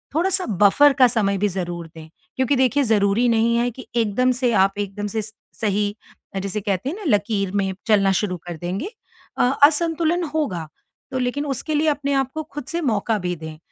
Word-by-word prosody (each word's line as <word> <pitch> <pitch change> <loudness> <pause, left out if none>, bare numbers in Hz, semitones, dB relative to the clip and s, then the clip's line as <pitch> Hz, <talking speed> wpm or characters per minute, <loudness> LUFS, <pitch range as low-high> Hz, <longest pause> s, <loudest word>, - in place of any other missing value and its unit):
थोड़ा-सा 370 +3 +1
बफ़र 215 +8 +4
का 260 -2 +5
समय 205 -4 0
भी 205 - +2
ज़रूर 175 -2 -4
दें। 160 -1 -11 0.3
क्योंकि 260 +2 +1
देखिए 260 +2 +3
ज़रूरी 215 0 +2
नहीं 230 0 +2
है 240 +1 +1
कि 255 +2 -11
एकदम 235 +2 +2
से 245 -2 +3
आप 195 -1 +3
एकदम 205 +1 -3
से 220 +2 -2
स 215 - -9 0.3
सही 205 -1 0 0.5
जिसे 200 +2 -3
कहते 195 +4 -2
हैं 320 - -4
न 300 - +1
लकीर 200 -2 +1
में 195 -1 0
चलना 200 -3 +4
शुरू 185 -2 -1
कर 170 - -5
देंगे। 180 - -4 0.5
अ - - +3 0.2
असंतुलन 330 +3 +3
होगा। 185 - -2 0.4
तो 260 - -2
लेकिन 255 +4 -1
उसके 285 +2 -3
लिए 310 +1 +2
अपने 280 -2 +1
को 315 - -3
खुद 295 -3 -8
से 340 +3 -3
मौका 225 - 0
भी 180 -1 -2
दें, 160 -1 -9
220 Hz, 195 wpm, -22 LUFS, 195-280 Hz, 0.5 s, का